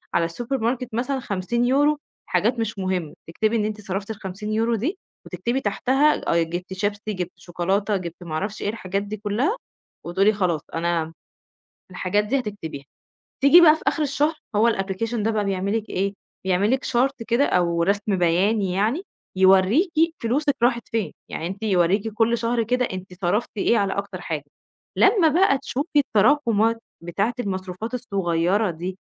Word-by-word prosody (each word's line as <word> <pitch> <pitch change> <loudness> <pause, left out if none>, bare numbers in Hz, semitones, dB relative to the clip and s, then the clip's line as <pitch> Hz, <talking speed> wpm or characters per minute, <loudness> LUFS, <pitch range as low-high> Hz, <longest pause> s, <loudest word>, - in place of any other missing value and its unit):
على 170 - +3
السوبر 240 +11 -3
ماركت 240 +2 -1
مثلًا 255 +4 -1
50€ 245 +9 +1 0.3
حاجات 220 +7 +1
مش 225 -2 -2
مُهمّة، 185 -5 -2 0.2
تكتبي 215 +7 0
إن 210 - 0
أنتِ 215 0 -4
صرفتِ 195 0 -4
ال50€ 215 +3 -2
دي 290 - -2 0.3
وتكتبي 245 +3 -2
تحتها 270 +8 +2
الأي 170 0 +1
جِبت 175 +3 -5
شيبسي، 205 +2 -2
جِبت 180 -2 -4
شوكولاتة، 195 +4 -1
جِبت 175 -1 -7
ما 165 -3 -7
أعرفش 205 +7 -3
إيه، - - -1
الحاجات 200 -2 -3
دي 210 +1 -6
كلّها 220 - 0 0.5
وتقولي 195 +5 +3
خلاص 180 -7 0
أنا 165 -1 -1 0.8
الحاجات 185 +3 0
دي 265 +6 +1
هتكتبيها. 200 - -6 0.6
تيجي 280 +6 +8
بقى 310 -2 +8
في - - -11
آخِر 310 - +2
الشهر 295 +2 +1 0.2
هو 225 +3 +4
الapplication 195 +4 -3
ده 220 0 0
بقى 210 -2 0
بيعمل 195 +2 0
لِك 220 0 -6
إيه، 195 +2 -1 0.3
بيعمل 190 +3 +2
لِك 265 +1 0
chart 260 +1 0
كده 245 +4 +3
أو 170 -5 +1
رَسم 200 +1 +1
بياني 185 +3 +2
يعني، 220 - 0 0.3
يورّيكِ 190 - +5 0.3
فلوسِك 275 +5 +1
راحت 240 -1 +2
فين، 225 -3 -2 0.2
يعني 165 - -4
أنتِ 195 +4 -7
يورّيكِ 195 +1 +2
كل 230 +2 +2
شهر 230 0 0
كده 250 +3 +1
أنتِ 185 -3 -7
صرفتِ 195 +6 +1
إيه 230 +4 +3
على 200 -2 +1
أكتر 200 -2 -5
حاجة، 155 -4 -3 0.5
لمّا 390 -5 +5
بقى 315 -2 +4
تشوفي 290 +4 -3
التراكُمات 230 -3 +3 0.2
بتاعة 195 +7 -1
المصروفات 190 +1 -4
الصغيّرة 195 -4 0
دي 180 +3 -6
210 Hz, 160 wpm, -23 LUFS, 185-235 Hz, 0.8 s, تيجي